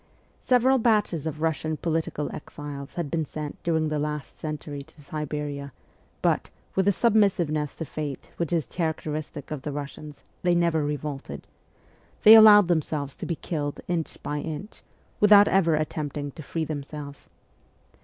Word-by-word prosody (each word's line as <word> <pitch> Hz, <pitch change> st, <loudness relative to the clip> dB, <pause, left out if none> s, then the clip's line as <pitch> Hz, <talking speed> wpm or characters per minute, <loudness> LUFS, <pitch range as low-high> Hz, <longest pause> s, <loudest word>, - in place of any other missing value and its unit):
Several 255 Hz, +1 st, +3 dB
batches 210 Hz, -, +2 dB
of 155 Hz, 0 st, -4 dB
Russian 160 Hz, -1 st, -1 dB
political 160 Hz, -3 st, -2 dB
exiles 145 Hz, -2 st, -8 dB
had 170 Hz, -5 st, -3 dB
been 165 Hz, -1 st, 0 dB
sent 150 Hz, 0 st, -6 dB
during 160 Hz, -2 st, +1 dB
the 150 Hz, -1 st, -1 dB
last 150 Hz, -4 st, -4 dB
century 150 Hz, -2 st, -5 dB
to 160 Hz, +2 st, -14 dB
Siberia, 145 Hz, -1 st, -5 dB, 0.5 s
but, -, -, +1 dB, 0.2 s
with 190 Hz, 0 st, +1 dB
the -, -, +7 dB
submissiveness 180 Hz, -, +2 dB
to 165 Hz, -, -5 dB
fate 145 Hz, -1 st, -6 dB
which 170 Hz, -3 st, -2 dB
is 165 Hz, -5 st, +1 dB
characteristic 155 Hz, 0 st, -4 dB
of 150 Hz, -3 st, -4 dB
the 150 Hz, -, -4 dB
Russians, 145 Hz, +1 st, -7 dB, 0.2 s
they 175 Hz, -1 st, +3 dB
never 170 Hz, -3 st, +2 dB
revolted; 145 Hz, -1 st, -4 dB, 0.8 s
they 215 Hz, -, +11 dB
allowed 210 Hz, -3 st, +9 dB
themselves 150 Hz, -4 st, -1 dB
to -, -, -6 dB
be 170 Hz, -, -1 dB
killed 145 Hz, -3 st, -4 dB
inch 170 Hz, -3 st, -2 dB
by 145 Hz, 0 st, -2 dB
inch, 160 Hz, +7 st, -6 dB, 0.4 s
without 205 Hz, -1 st, +8 dB
ever 170 Hz, -5 st, +3 dB
attempting 150 Hz, -2 st, -3 dB
to 155 Hz, -, -10 dB
free 160 Hz, +2 st, -3 dB
themselves. 145 Hz, -1 st, -7 dB
155 Hz, 150 wpm, -26 LUFS, 145-170 Hz, 0.8 s, they